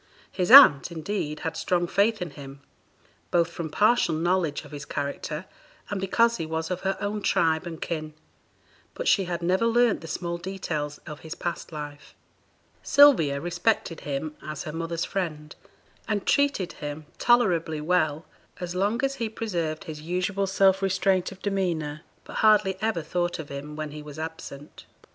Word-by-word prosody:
His 180 0 -1
aunt, 200 - +9
indeed, 160 -2 -4
had 160 0 -3
strong 175 +1 0
faith 200 +3 +1
in 170 - -7
him, 140 -1 -11 0.7
both 170 -1 +2
from 170 -2 -5
partial 210 -1 +3
knowledge 170 -2 0
of - - -13
his 145 -1 -7
character, 150 +3 -4 0.5
and 200 -2 -2
because 230 +4 +2
he 165 - -3
was 160 +1 -3
of 180 - -2
her 190 0 -1
own 205 +1 -2
tribe 160 -3 +1
and 165 -2 -7
kin; 155 -2 -4 0.8
but - - -4
she 195 - +4
had 175 -1 -4
never 185 +6 +2
learnt 235 -1 +3
the 165 - -9
small 170 +2 -3
details 165 -6 -4
of 150 -2 -8
his 160 0 -8
past 175 -1 -5
life. 150 -1 -8 0.7
Sylvia 245 - +5
respected 175 +1 -1
him 150 +2 -4
as 155 -2 -6
her 155 - -6
mother's 165 0 -3
friend, 155 -5 -4 0.5
and 205 -3 -1
treated 280 -11 +1
him 150 +1 -5
tolerably 175 -10 +3
well 155 -1 0 0.3
as 175 -1 -4
long 205 +7 0
as 270 - -1
he 230 -3 -2
preserved 175 -8 -3
his 155 -5 -8
usual 185 +4 -1
self 190 0 +3
restraint 190 -1 +1
of 190 -1 -13
demeanour, 170 -7 -1 0.2
but - - -8
hardly 210 -3 +4
ever 215 -7 0
thought 175 +2 -1
of 155 -3 -8
him 145 +2 -7
when 155 -1 -5
he 150 0 -8
was 150 0 -10
absent. 155 -3 -8
170 Hz, 165 wpm, -26 LUFS, 155-195 Hz, 0.8 s, aunt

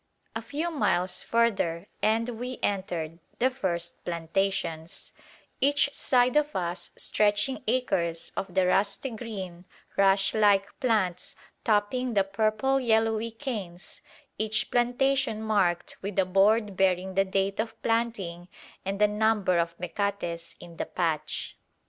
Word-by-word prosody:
A 225 - -2
few 295 +8 -3
miles 185 - +1
further 200 -7 +1 0.2
and 225 +2 +2
we 250 +1 -4
entered 175 -5 -2 0.2
the 255 +2 +2
first 175 -9 -3
plantations, 170 -1 -2 0.5
each 285 +1 +3
side 250 0 +2
of 300 0 +2
us 175 0 -2
stretching 210 +5 +1
acres 170 -9 +1
of 190 - -3
the 190 -1 +4
rusty 200 +7 +1
green 195 -6 -7 0.3
rush 195 0 +4
like 205 -2 +3
plants 210 -9 0 0.3
topping 225 +3 +1
the 200 - +5
purple 215 +7 +1
yellowy 225 -2 +2
canes, 215 -8 -6 0.4
each 220 +2 0
plantation 250 0 +2
marked 200 -6 0
with 200 0 -5
a 190 - +4
board 200 +2 +3
bearing 190 0 +1
the 195 +1 +3
date 195 +1 -1
of 225 +1 -3
planting 210 -7 -1 0.4
and 195 +1 -2
the 210 +1 +5
number 210 -4 +2
of 170 0 -1
mecates 180 -2 -3
in 170 -1 -12
the - - -3
patch. 165 -4 -2
205 Hz, 130 wpm, -27 LUFS, 180-230 Hz, 0.5 s, the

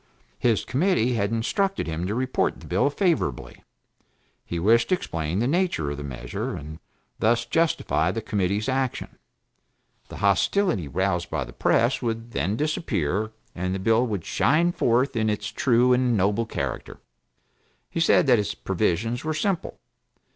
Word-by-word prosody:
His 115 -4 +1
committee 135 - +1
had 100 -3 0
instructed 190 - 0
him 80 +2 -3
to 105 - -2
report 130 +1 0
the - - -13
bill - - +1
favorably; 165 - -1 0.8
he 85 - -5
wished 115 +7 +3
to 185 - +4
explain 80 - -3
the 115 +4 +1
nature 165 - 0
of 70 - -5
the 75 - -6
measure, 65 -4 -5
and 75 +2 -8 0.4
thus 115 +1 +2
justify 165 +6 +1
the - - -2
committee's 100 +2 -1
action; 130 -1 -2 0.9
the - - -9
hostility 100 - +1
roused 85 +3 -1
by - - -2
the - - -11
press 120 +3 +2
would 115 -1 -3
then 100 -1 -1
disappear, 110 - -1 0.2
and 90 +1 -2
the - - -3
bill 115 +5 +2
would 100 -7 -3
shine 170 +4 +2
forth 125 -3 +1
in 110 -1 +1
its 105 - -2
true 125 -4 +3
and 125 -2 +2
noble 105 +4 +1
character. - - -4 0.9
He - - -4
said 165 +1 +4
that 125 -4 +5
its 105 - -2
provisions 105 +5 -1
were 155 0 -2
simple. 180 +2 -2
115 Hz, 155 wpm, -25 LUFS, 95-135 Hz, 0.9 s, that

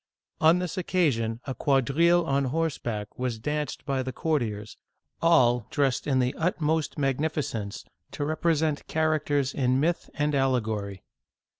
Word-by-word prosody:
On 160 +2 +5
this 180 +1 -3
occasion, 125 -11 0
a 135 - -3
quadrille 150 +7 +3
on 140 -2 +1
horseback 125 -8 -3
was 125 -3 -1
danced 150 +6 -3
by 135 -1 0
the 130 0 -4
courtiers, 115 -8 -2 0.5
all 125 -9 +4
dressed 135 -2 0
with 135 -3 +2
the 125 +1 +1
utmost 160 -2 0
magnificence 135 -7 -2 0.3
to 145 - -2
rep 155 +1 -3
resent 160 -3 +1
characters 150 -3 0
in 130 -1 +1
myth 165 +4 0
and 150 0 0
allegory. 110 -8 -1
140 Hz, 135 wpm, -27 LUFS, 125-160 Hz, 0.5 s, On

